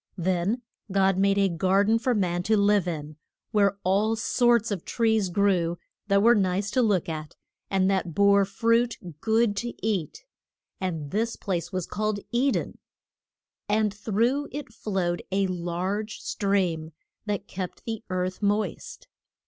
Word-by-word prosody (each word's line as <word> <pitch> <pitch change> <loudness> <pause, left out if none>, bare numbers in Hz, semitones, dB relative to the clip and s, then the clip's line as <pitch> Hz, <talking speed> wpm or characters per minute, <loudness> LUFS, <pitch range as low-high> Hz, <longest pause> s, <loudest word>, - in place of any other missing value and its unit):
Then 185 +7 0 0.3
God 190 -1 +3
made 195 0 +3
a 200 -1 +4
gar 190 +3 +2
den 220 +2 +3
for 250 0 +1
man 175 -4 0
to 220 - +5
live 200 -2 +3
in, 155 -3 -5 0.3
where 200 -2 +3
all 200 +4 +2
sorts 235 0 +2
of 190 -5 -3
trees 220 -4 +1
grew 175 -3 +1 0.3
that 200 0 +3
were 235 +1 +7
nice 195 -1 0
to 255 - +2
look 205 -7 +2
at, 155 -2 -6 0.3
and 190 -1 +2
that 180 -4 -1
bore 200 0 +5
fruit 230 +4 +1 0.2
good 225 -1 +2
to 240 +3 -3
eat. 205 - -2 0.5
And 165 -6 -3
this 225 +3 0
place 180 -3 -3
was 185 -3 -2
called 215 -1 -2
E 250 +3 +2
den. - - -2 0.9
And 210 -1 +2
through 230 +7 0
it 280 -5 -7
flowed 185 -6 -2
a 195 +1 +2
large 185 +4 -3
stream 180 -6 -1 0.3
that 205 -1 -2
kept 185 -1 -6
the 225 -1 -4
earth 185 +1 -2
moist. 210 - -2
200 Hz, 150 wpm, -26 LUFS, 185-220 Hz, 0.9 s, were